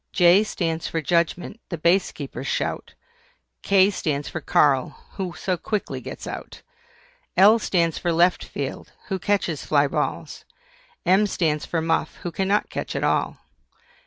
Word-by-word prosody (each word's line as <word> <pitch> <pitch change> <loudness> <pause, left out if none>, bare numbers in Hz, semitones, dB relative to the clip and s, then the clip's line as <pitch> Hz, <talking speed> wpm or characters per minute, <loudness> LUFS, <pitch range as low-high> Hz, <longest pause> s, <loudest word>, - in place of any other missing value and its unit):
J 180 +3 +6
stands 165 -6 -2
for 165 - -2
JUDGEMENT, 170 +5 0
the 170 - -4
Base 170 +5 +2
Keeper's 140 -1 -7
shout. - - -3 0.7
K 195 0 +4
stands 145 -6 -2
for 160 - -5
KARL, 140 -3 +2 0.2
who 185 -3 -5
so 185 0 -2
quickly 210 +3 -3
gets - - -8
out. - - -8 0.7
L 210 +4 +7
stands 170 -6 0
for 175 - 0
LEFT 175 +2 +3
FIELD, - - -6 0.2
who 190 -2 -1
catches 175 -6 -1
FLY 145 -1 +3
BALLS. 140 - -3 0.6
M 195 +3 +4
stands 155 -6 -1
for 165 -2 -1
MUFF, 165 -1 0
who 175 - -3
cannot 195 +4 0
catch - - -4
at - - -2
all. - - 0
175 Hz, 150 wpm, -23 LUFS, 160-190 Hz, 0.7 s, L